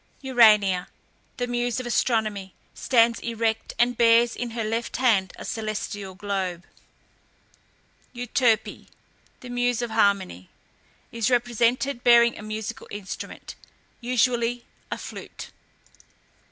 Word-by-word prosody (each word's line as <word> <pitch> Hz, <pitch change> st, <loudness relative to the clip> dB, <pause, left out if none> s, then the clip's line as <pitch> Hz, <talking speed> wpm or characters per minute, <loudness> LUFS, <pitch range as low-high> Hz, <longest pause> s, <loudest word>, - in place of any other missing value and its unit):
URANIA, 210 Hz, -8 st, +4 dB, 0.5 s
the 245 Hz, -, -1 dB
muse 245 Hz, 0 st, -1 dB
of 255 Hz, -, -6 dB
Astronomy, 215 Hz, -6 st, -1 dB, 0.2 s
stands 235 Hz, -2 st, +2 dB
erect, 225 Hz, -1 st, -2 dB
and 245 Hz, +1 st, +2 dB
bears 230 Hz, 0 st, +4 dB
in 245 Hz, -, -4 dB
her 230 Hz, 0 st, -4 dB
left 225 Hz, +2 st, -3 dB
hand 215 Hz, -7 st, +2 dB
a -, -, -8 dB
celestial 205 Hz, -3 st, -5 dB
globe. 190 Hz, -3 st, -3 dB, 1.5 s
EUTERPE, 240 Hz, -2 st, 0 dB, 0.5 s
the 250 Hz, -, -10 dB
muse 245 Hz, -1 st, 0 dB
of 235 Hz, -, -4 dB
Harmony, 200 Hz, -, 0 dB, 0.6 s
is 230 Hz, -1 st, -1 dB
represented 245 Hz, +1 st, +1 dB
bearing 235 Hz, -1 st, +6 dB
a -, -, -9 dB
musical 215 Hz, +1 st, -6 dB
instrument, 205 Hz, -2 st, -8 dB, 0.5 s
usually 240 Hz, -1 st, 0 dB, 0.2 s
a -, -, -3 dB
flute. -, -, -9 dB
230 Hz, 110 wpm, -25 LUFS, 210-245 Hz, 1.5 s, bearing